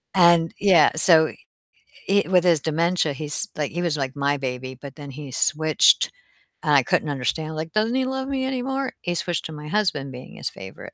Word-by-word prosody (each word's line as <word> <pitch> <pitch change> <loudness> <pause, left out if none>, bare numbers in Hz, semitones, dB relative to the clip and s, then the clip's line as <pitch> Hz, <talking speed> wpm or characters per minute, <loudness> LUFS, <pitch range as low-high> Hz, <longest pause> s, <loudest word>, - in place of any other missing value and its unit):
And 170 -2 +4
yeah, 190 -6 +5
so 160 -1 +7 0.8
i 200 0 +4
with 180 -1 +3
his 170 -4 +3
dementia 165 0 0
he's 150 +8 -2
Like, 150 -2 -2
he 175 - -3
was 165 -3 -1
like 135 -1 -3
my 140 +1 0
baby, 130 -1 -5
but 140 -1 -10
then 145 -2 -9
he 140 0 -9
switched 155 +3 +2 0.5
and 150 -2 +1
I 140 - +6
couldn't 150 +4 -1
understand, 150 +4 -3
like, 160 +1 -6
"Doesn't 220 +3 0
he 260 0 +1
love 265 0 -4
me 270 -1 -2
anymore?" 265 +1 -3
He 175 - -3
switched 175 0 -3
to 160 - -6
my 150 0 -9
husband 155 -8 -1
being 125 0 -11
his - - -4
favorite. 95 0 -11
160 Hz, 200 wpm, -22 LUFS, 145-185 Hz, 0.8 s, so